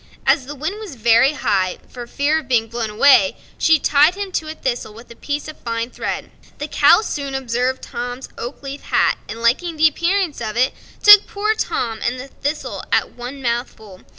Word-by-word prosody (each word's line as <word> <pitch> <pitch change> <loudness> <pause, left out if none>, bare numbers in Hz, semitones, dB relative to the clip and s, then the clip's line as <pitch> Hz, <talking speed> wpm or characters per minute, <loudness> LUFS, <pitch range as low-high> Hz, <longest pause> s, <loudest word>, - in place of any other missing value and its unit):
As 255 - +2
the 295 - -7
wind 315 +9 -4
was 405 -10 -8
very 235 +4 +4
high, 195 -9 0
for 245 -1 -9
fear 290 +5 0
of 300 - -12
being 235 -3 +2
blown 230 -1 -3
away, 280 +6 +4 0.2
she 320 0 +5
tied 300 +4 +3
him 400 -1 -5
to 315 -3 -2
a 310 - -6
thistle 240 -6 -4
with 235 +1 -14
a - - -11
piece 290 +3 -4
of 310 - -10
fine 230 +1 -3
thread. - - -5 0.3
The - - -5
cow - - +5
soon 280 -10 -4
observed 255 0 -2
Tom's 245 +2 -6
oak 245 +4 -7
leaf 275 +1 -7
hat, - - +2
and 225 +2 -7
liking 320 +9 +1
the 315 +1 +6
appearance 340 0 -1
of 220 0 -4
it, 255 +2 +2 0.3
took 415 -1 +9
poor 425 +2 -1
Tom 230 - -2
and 250 +2 -1
the 265 +2 -9
thistle 290 +3 -4
at - - +1
one 255 +3 -8
mouthful. 235 -5 -4
265 Hz, 200 wpm, -19 LUFS, 235-310 Hz, 0.3 s, took